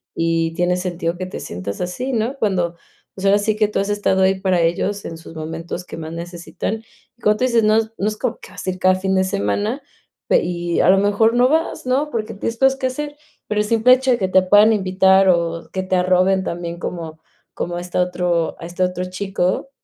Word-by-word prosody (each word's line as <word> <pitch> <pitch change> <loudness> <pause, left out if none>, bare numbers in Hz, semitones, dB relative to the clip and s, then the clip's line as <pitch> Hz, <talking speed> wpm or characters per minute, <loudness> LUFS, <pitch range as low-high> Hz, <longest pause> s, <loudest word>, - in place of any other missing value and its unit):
y 165 0 0
tiene 180 +1 +1
sentido 175 -2 -3
que 185 - -4
te 185 - -7
sientas 90 +3 -6
así, 240 +10 -3
¿no? 235 +4 -1
Cuando, 180 -6 0 0.4
pues, 195 - -5
ahora 200 +1 +5
sí 210 +1 0
que 215 -1 +3
tú - - -1
has 200 - -1
estado 205 -2 +1
ahí 190 0 +2
para 185 -2 +1
ellos 190 +5 0
en 165 - -6
sus 165 0 -12
momentos 165 +3 -6
que - - -9
más 160 0 -6
necesitan. 175 +6 -5 0.3
Y - - -30
como 210 -1 +3
tú 250 - -2
dices, 235 -3 +2
no 215 0 +4
es 225 0 0
no 200 - -1
es 215 0 -2
como - - -2
que - - -13
vas - - -9
a - - +2
ir 185 - -8
cada 185 0 +4
fin 190 +1 -1
de 190 - +3
semana, 205 +6 -1 0.5
pe - - +4
y 175 -1 -2
a - - +4
lo 190 - +6
mejor 205 +3 +3
no 245 +1 +5
vas, 320 -1 0
¿no?, 270 +4 +1
porque 220 -4 -3
tienes 230 +3 -4
cosas 270 +1 +3
qué 260 - +1
hacer, 290 +3 -5 0.3
pero 210 0 +1
el - - -1
simple 230 +3 +5
hecho 260 0 +2
de 240 - +3
que 190 - 0
te 185 0 +5
puedan 205 +4 +6
invitar 190 -1 +4
o 170 -1 0
que 190 - -2
te 185 0 0
arroben 185 +1 +3
también 170 -1 -5
como 160 -3 -6 0.3
como 175 - -4
a - - -3
este 180 0 -5
otro 180 -2 0
a - - -7
este 175 +2 -2
otro 180 0 -1
chico, 185 +4 -2
190 Hz, 235 wpm, -20 LUFS, 175-215 Hz, 0.5 s, lo